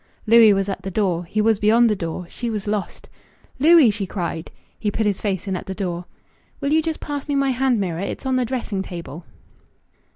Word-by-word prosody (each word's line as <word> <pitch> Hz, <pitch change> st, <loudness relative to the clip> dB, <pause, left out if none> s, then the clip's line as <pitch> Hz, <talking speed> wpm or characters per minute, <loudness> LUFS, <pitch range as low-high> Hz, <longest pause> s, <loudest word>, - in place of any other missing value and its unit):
Louis 225 Hz, -1 st, +7 dB
was 195 Hz, -1 st, +1 dB
at 195 Hz, -, -4 dB
the 195 Hz, -, -5 dB
door... 180 Hz, -3 st, 0 dB
he 215 Hz, +5 st, -1 dB
was 220 Hz, -1 st, +2 dB
beyond 230 Hz, +3 st, +5 dB
the 215 Hz, -, +2 dB
door... 170 Hz, -1 st, -5 dB
she 235 Hz, +6 st, -5 dB
was 215 Hz, -3 st, -3 dB
lost. 210 Hz, -1 st, -4 dB, 0.5 s
"Louis!" 310 Hz, -4 st, +7 dB
she 200 Hz, -2 st, -4 dB
cried. 170 Hz, -4 st, -4 dB, 0.3 s
He 210 Hz, -, 0 dB
put 215 Hz, +2 st, -1 dB
his 205 Hz, -2 st, 0 dB
face 195 Hz, -2 st, -2 dB
in 190 Hz, -, -1 dB
at -, -, -6 dB
the 190 Hz, -, -4 dB
door. 180 Hz, -3 st, -3 dB, 0.5 s
"Will 280 Hz, +1 st, 0 dB
you 320 Hz, -, +4 dB
just 320 Hz, 0 st, -3 dB
pass 290 Hz, -2 st, -5 dB
me 290 Hz, -, -1 dB
my 275 Hz, -1 st, +2 dB
hand 255 Hz, -2 st, +1 dB
mirror. 175 Hz, -4 st, -2 dB
It's 200 Hz, +7 st, -5 dB
on 260 Hz, -1 st, +1 dB
the 255 Hz, -, +2 dB
dressing 235 Hz, -5 st, -3 dB
table." 170 Hz, -4 st, -8 dB
210 Hz, 220 wpm, -22 LUFS, 190-245 Hz, 0.5 s, Louis